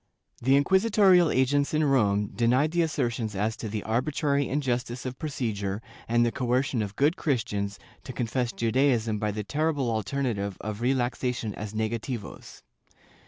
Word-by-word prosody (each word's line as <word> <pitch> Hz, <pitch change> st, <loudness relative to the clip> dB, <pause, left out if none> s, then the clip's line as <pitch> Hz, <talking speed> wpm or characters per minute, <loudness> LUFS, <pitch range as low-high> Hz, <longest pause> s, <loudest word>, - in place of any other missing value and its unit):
^ -, -, -15 dB
The 135 Hz, +2 st, +4 dB
inquisitorial 190 Hz, +2 st, +4 dB
agents 140 Hz, +3 st, +2 dB
in 155 Hz, -, +2 dB
Rome 105 Hz, -8 st, +2 dB
denied 125 Hz, +7 st, +2 dB
the 175 Hz, 0 st, +2 dB
assertions 120 Hz, -9 st, -1 dB
as 105 Hz, +3 st, 0 dB
to 110 Hz, -, -5 dB
the 105 Hz, 0 st, -3 dB
arbitrary 140 Hz, +4 st, 0 dB
injustice 125 Hz, -3 st, -2 dB
of 130 Hz, 0 st, -5 dB
procedure 110 Hz, -, -3 dB, 0.3 s
and 120 Hz, +1 st, +3 dB
the 120 Hz, -, +1 dB
coercion 125 Hz, 0 st, 0 dB
of 105 Hz, -1 st, -4 dB
good 145 Hz, -, +3 dB
Christians 105 Hz, -, -1 dB, 0.3 s
to -, -, -6 dB
confess 120 Hz, 0 st, -1 dB
Judaism 115 Hz, -2 st, +1 dB
by 105 Hz, -, 0 dB
the 105 Hz, +1 st, -3 dB
terrible 145 Hz, +2 st, 0 dB
alternative 110 Hz, -3 st, -2 dB
of 105 Hz, 0 st, -5 dB
relaxa 125 Hz, 0 st, 0 dB
tion 110 Hz, -4 st, -4 dB
as 105 Hz, +1 st, -7 dB
negativos. 110 Hz, +1 st, -4 dB
120 Hz, 155 wpm, -27 LUFS, 110-140 Hz, 0.3 s, The